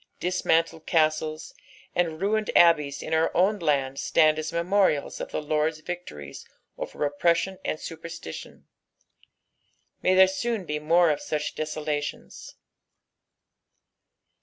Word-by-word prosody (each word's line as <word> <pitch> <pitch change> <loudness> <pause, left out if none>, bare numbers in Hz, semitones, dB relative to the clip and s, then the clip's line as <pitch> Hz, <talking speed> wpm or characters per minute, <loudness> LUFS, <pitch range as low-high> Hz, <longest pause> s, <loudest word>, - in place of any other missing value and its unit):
Dismantled 165 -2 0
castles 155 -1 0 0.4
and 165 -3 0
ruined 215 +3 0
abbeys 150 -5 +4
in - - -4
our 160 0 +3
own 200 +4 +3
land 140 -4 0
stand 155 -1 +3
as 155 0 -4
memorials 170 -2 +1
of - - -5
the - - -4
Lord's 155 +1 0
victories 155 - -7 0.3
over - - -4
oppression 170 +6 +1
and 155 - -2
superstition. 160 - -9 1.4
Hay 185 - +3
there 190 0 +8
soon 210 +1 -2
be 150 -1 -3
more 165 +2 +4
of 150 - -2
such 155 -6 -3
desoladona. 150 -1 -5
160 Hz, 115 wpm, -26 LUFS, 150-180 Hz, 1.4 s, there